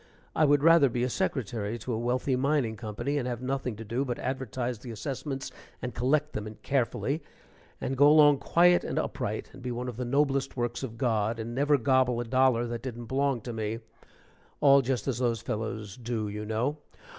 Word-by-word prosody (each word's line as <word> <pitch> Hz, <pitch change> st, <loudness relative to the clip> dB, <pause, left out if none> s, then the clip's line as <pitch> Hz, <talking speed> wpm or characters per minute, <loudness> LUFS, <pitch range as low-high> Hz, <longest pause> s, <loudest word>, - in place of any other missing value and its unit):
I 155 Hz, -, +4 dB
would 145 Hz, -1 st, +3 dB
rather 165 Hz, -4 st, +6 dB
be 120 Hz, +1 st, 0 dB
secretary 115 Hz, -3 st, -2 dB
to 120 Hz, +2 st, -4 dB
a 110 Hz, -, -1 dB
wealthy 125 Hz, +3 st, 0 dB
mining 135 Hz, -3 st, +1 dB
company, 115 Hz, +6 st, -3 dB
and 125 Hz, -, -3 dB
have 120 Hz, -2 st, -3 dB
nothing 130 Hz, -2 st, -2 dB
to 110 Hz, +2 st, -8 dB
do 120 Hz, +6 st, -1 dB
but 125 Hz, -3 st, -3 dB
advertise 125 Hz, -2 st, -3 dB
the 125 Hz, -, -9 dB
assessments 135 Hz, +4 st, -4 dB, 0.3 s
and 125 Hz, -1 st, -5 dB
collect 145 Hz, +7 st, +1 dB
them 105 Hz, 0 st, -4 dB
in 110 Hz, -, -8 dB
carefully, 135 Hz, +3 st, 0 dB, 0.6 s
and 135 Hz, -, -2 dB
go 145 Hz, +2 st, +6 dB
along 145 Hz, -2 st, +7 dB
quiet 175 Hz, +1 st, +4 dB
and -, -, -3 dB
upright, -, -, -3 dB
and -, -, -12 dB
be 125 Hz, -, -4 dB
one 120 Hz, +1 st, -4 dB
of 120 Hz, -3 st, -6 dB
the 125 Hz, -, -2 dB
noblest 135 Hz, +1 st, +1 dB
works 120 Hz, -1 st, -2 dB
of 115 Hz, -4 st, -6 dB
God, 115 Hz, -3 st, 0 dB
and 115 Hz, +1 st, -5 dB
never 145 Hz, +3 st, +3 dB
gobble 130 Hz, -1 st, +2 dB
a -, -, -1 dB
dollar 130 Hz, -1 st, +3 dB
that 120 Hz, -1 st, -4 dB
didn't 120 Hz, -2 st, -6 dB
belong 135 Hz, 0 st, 0 dB
to 120 Hz, +2 st, -6 dB
me 110 Hz, 0 st, -2 dB, 0.8 s
all 140 Hz, -1 st, +6 dB
just 130 Hz, 0 st, -2 dB
as 125 Hz, -3 st, -1 dB
those 120 Hz, -3 st, +1 dB
fellows 110 Hz, -2 st, -4 dB
do, 115 Hz, -3 st, -3 dB
you 105 Hz, +1 st, -5 dB
know. 125 Hz, +8 st, -1 dB
125 Hz, 200 wpm, -28 LUFS, 115-135 Hz, 0.8 s, along